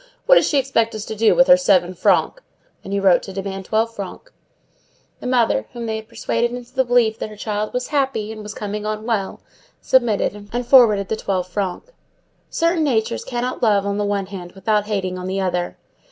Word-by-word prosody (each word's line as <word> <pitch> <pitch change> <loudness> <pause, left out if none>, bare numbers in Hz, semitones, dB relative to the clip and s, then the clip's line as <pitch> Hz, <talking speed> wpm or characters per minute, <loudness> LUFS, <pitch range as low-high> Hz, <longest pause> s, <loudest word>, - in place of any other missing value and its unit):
What - - +6
does - - +5
she 290 - +1
expect 235 -4 +1
us 215 0 -5
to 220 - -6
do 220 +1 +3
with 265 - +6
her 270 - +8
seven 185 -9 +2
francs?" - - +1 0.4
and 195 - -8
he 200 - 0
wrote 190 -2 +4
to - - -8
demand 195 0 -5
twelve 225 +2 0
francs. 200 - -8 0.9
The - - -6
mother, 235 - +1
whom 235 -1 -5
they 220 -1 -2
had 220 0 -9
persuaded 230 +1 -1
into 245 0 -8
the 260 0 +2
belief 240 -3 +2
that - - -4
her 215 - -11
child 210 0 -3
was 250 0 -3
happy, 265 -7 -1
"and 220 -1 -8
was 210 0 -8
coming 210 0 -4
on 215 0 -4
well," 215 -5 -2 0.4
submitted, 210 -4 +1
and 245 +1 -2
forwarded 220 -7 +5
the - - 0
twelve 190 -4 -2
francs. 195 - -4 0.6
Certain 335 0 +1
natures 220 - 0
cannot 245 +1 -3
love 205 -4 +3
on 200 0 -1
the - - +1
one 205 -1 -1
hand 185 -2 -9
without 210 +2 0
hating 190 -3 -2
on 180 - -5
the 190 +1 -2
other. 180 -2 -2
215 Hz, 210 wpm, -20 LUFS, 195-240 Hz, 0.9 s, her